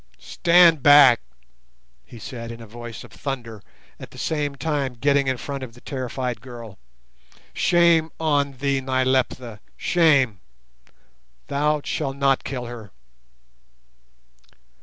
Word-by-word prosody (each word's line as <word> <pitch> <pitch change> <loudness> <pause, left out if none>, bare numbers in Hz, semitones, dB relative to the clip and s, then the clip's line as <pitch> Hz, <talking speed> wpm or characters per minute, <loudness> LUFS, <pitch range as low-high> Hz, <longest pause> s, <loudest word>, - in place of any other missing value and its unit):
"Stand 170 - +4
back," 145 -4 +7 0.8
he 120 - -14
said 115 0 -8
in 115 - -9
a 115 - -10
voice 120 +1 -9
of - - -15
thunder, 120 -6 -6 0.4
at - - -10
the - - -15
same 145 -3 -2
time 140 -3 -2
getting 140 +3 +1
in 130 -1 0
front 135 +4 -6
of 120 -3 -8
the 120 - -16
terrified 130 -2 -4
girl. 115 -5 -11 0.7
"Shame 170 -2 +3
on 145 -3 +1
thee, 135 +1 -1
Nyleptha—shame! 130 - 0 1.1
Thou 150 +1 0
shalt 135 -3 -3
not 135 -1 +2
kill 125 -3 -5
her." 115 -4 -9
135 Hz, 115 wpm, -23 LUFS, 120-145 Hz, 1.1 s, back